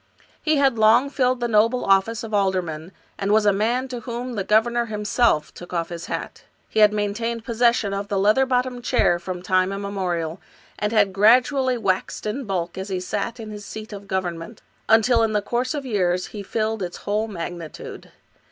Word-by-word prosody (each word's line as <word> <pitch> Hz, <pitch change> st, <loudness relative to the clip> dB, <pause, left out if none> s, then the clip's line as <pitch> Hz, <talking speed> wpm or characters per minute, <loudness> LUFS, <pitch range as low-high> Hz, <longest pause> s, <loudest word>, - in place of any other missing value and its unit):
He 310 Hz, 0 st, +2 dB
had 270 Hz, -5 st, +2 dB
long 235 Hz, +6 st, +5 dB
filled 255 Hz, -3 st, +1 dB
the 240 Hz, -, +1 dB
noble 230 Hz, +3 st, +2 dB
office 195 Hz, +5 st, +2 dB
of 220 Hz, -1 st, -7 dB
alderman, 185 Hz, -5 st, -1 dB, 0.3 s
and 200 Hz, 0 st, 0 dB
was 215 Hz, 0 st, +4 dB
a 205 Hz, -, +5 dB
man 235 Hz, +6 st, 0 dB
to 250 Hz, -1 st, -5 dB
whom 240 Hz, +2 st, -5 dB
the 205 Hz, -4 st, -2 dB
governor 235 Hz, +4 st, +2 dB
himself 210 Hz, -4 st, +1 dB
took 175 Hz, 0 st, -11 dB
off 170 Hz, -1 st, -1 dB
his 170 Hz, -1 st, -7 dB
hat. -, -, -6 dB, 0.2 s
He -, -, -1 dB
had 210 Hz, -1 st, +7 dB
maintained 220 Hz, +2 st, -2 dB
possession 235 Hz, -3 st, +2 dB
of 200 Hz, +1 st, -3 dB
the 200 Hz, -1 st, -1 dB
leather 215 Hz, +7 st, +3 dB
bottomed 250 Hz, -1 st, -1 dB
chair 175 Hz, -6 st, +2 dB
from 180 Hz, 0 st, -6 dB
time 185 Hz, +1 st, +2 dB
immemorial, 190 Hz, -4 st, -3 dB, 0.4 s
and 210 Hz, 0 st, -1 dB
had 205 Hz, -4 st, +3 dB
gradually 250 Hz, +5 st, +4 dB
waxed 195 Hz, -3 st, -1 dB
in 240 Hz, +6 st, -3 dB
bulk 180 Hz, -3 st, -3 dB
as 190 Hz, +2 st, -5 dB
he 185 Hz, -1 st, -2 dB
sat 210 Hz, +6 st, -3 dB
in 220 Hz, -1 st, -7 dB
his 210 Hz, -1 st, -8 dB
seat 215 Hz, +1 st, -8 dB
of 200 Hz, 0 st, -9 dB
government, 185 Hz, +1 st, -4 dB, 0.3 s
until 225 Hz, +2 st, +5 dB
in 225 Hz, -1 st, +1 dB
the 210 Hz, -, +3 dB
course 250 Hz, +6 st, -1 dB
of 285 Hz, -2 st, -4 dB
years 185 Hz, -6 st, 0 dB
he 210 Hz, -, -5 dB
filled 215 Hz, +2 st, -2 dB
its 175 Hz, -1 st, -4 dB
whole 210 Hz, +2 st, 0 dB
magnitude. 170 Hz, -4 st, -7 dB
210 Hz, 190 wpm, -23 LUFS, 190-235 Hz, 0.4 s, had